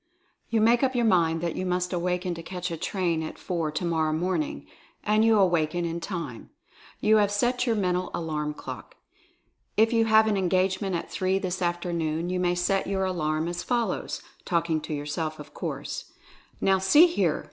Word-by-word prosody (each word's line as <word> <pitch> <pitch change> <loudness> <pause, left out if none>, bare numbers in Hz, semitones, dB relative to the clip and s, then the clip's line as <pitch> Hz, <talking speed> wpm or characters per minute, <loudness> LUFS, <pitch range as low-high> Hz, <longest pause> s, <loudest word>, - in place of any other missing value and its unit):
You 225 -1 +2
make 235 +2 +4
up 265 -1 +1
your 240 -1 +2
mind 165 -5 +3
that 170 -1 -2
you - - -2
must 180 0 -1
awaken 180 +1 -1
to 165 - -7
catch 180 0 -5
a - - -2
train 170 -1 -1
at 155 - -6
four 170 -4 -2
tomor 160 0 0
row 155 - 0
morning 170 -1 -1 0.2
— - - -33
and 215 +1 +3
you 225 -1 +5
awaken 175 -3 +2
in 170 0 -3
time. 165 - -6 0.5
You 215 +1 +5
have 205 -1 +3
set 245 +5 +1
your 230 - +2
mental 180 -3 0
alarm 150 -2 -3
clock. - - -8 0.8
If 225 +2 +4
you 225 -1 +4
have 220 0 +5
an 215 -2 +1
engage 185 +1 +1
ment 195 -3 -1
at 170 - -4
three 185 +1 +1
this 185 -1 -3
afternoon 175 -1 -1
you 185 - -1
may 175 -1 +1
set 190 +2 0
your 190 0 0
alarm 160 -4 -1
as 175 0 -3
follows 240 -2 -2 0.2
(talking 170 -2 0
to 155 0 -5
yourself, 155 +2 -3
of 150 - -11
course): - - -5 0.5
Now, 190 0 +3
see 240 - +7
here! 345 0 +1
180 Hz, 190 wpm, -26 LUFS, 165-200 Hz, 0.8 s, see